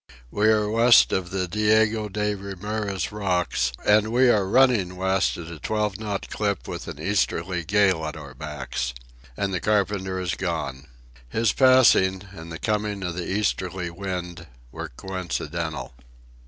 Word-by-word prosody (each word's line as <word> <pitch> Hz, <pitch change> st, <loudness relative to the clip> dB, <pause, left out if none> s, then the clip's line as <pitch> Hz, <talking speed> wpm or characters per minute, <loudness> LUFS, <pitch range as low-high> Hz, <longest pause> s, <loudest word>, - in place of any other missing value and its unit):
We 105 Hz, +1 st, +2 dB
are 105 Hz, -1 st, +3 dB
west 115 Hz, +2 st, +6 dB
of 90 Hz, -2 st, -1 dB
the 95 Hz, -1 st, -2 dB
Diego 105 Hz, +2 st, +2 dB
de 105 Hz, +1 st, -1 dB
Ramirez 100 Hz, 0 st, -4 dB
Rocks, 90 Hz, -11 st, 0 dB
and 105 Hz, +1 st, +4 dB
we 125 Hz, +1 st, +4 dB
are 100 Hz, -4 st, +2 dB
running 110 Hz, -6 st, +3 dB
west 95 Hz, 0 st, +1 dB
at 85 Hz, -, -7 dB
a 85 Hz, -1 st, -9 dB
twelve 105 Hz, 0 st, -1 dB
knot 105 Hz, -2 st, -4 dB
clip 100 Hz, -3 st, -2 dB
with -, -, -6 dB
an -, -, -7 dB
easterly 90 Hz, -1 st, -1 dB
gale 95 Hz, -3 st, +2 dB
at 75 Hz, -, -6 dB
our 65 Hz, -, -10 dB
backs. 65 Hz, -4 st, -4 dB, 0.4 s
And 100 Hz, -1 st, -1 dB
the 90 Hz, -, 0 dB
carpenter 100 Hz, -3 st, 0 dB
is 90 Hz, -2 st, -2 dB
gone. 80 Hz, -6 st, -4 dB, 0.4 s
His 115 Hz, -, +1 dB
passing, 120 Hz, -8 st, +5 dB
and 85 Hz, -3 st, -10 dB
the 80 Hz, -, -5 dB
coming 105 Hz, -1 st, -2 dB
of 90 Hz, -2 st, -2 dB
the 85 Hz, +1 st, -5 dB
easterly 95 Hz, -3 st, -1 dB
wind, 90 Hz, -2 st, -5 dB, 0.2 s
were -, -, -6 dB
coincidental. 95 Hz, +1 st, -4 dB
95 Hz, 155 wpm, -24 LUFS, 90-105 Hz, 0.4 s, west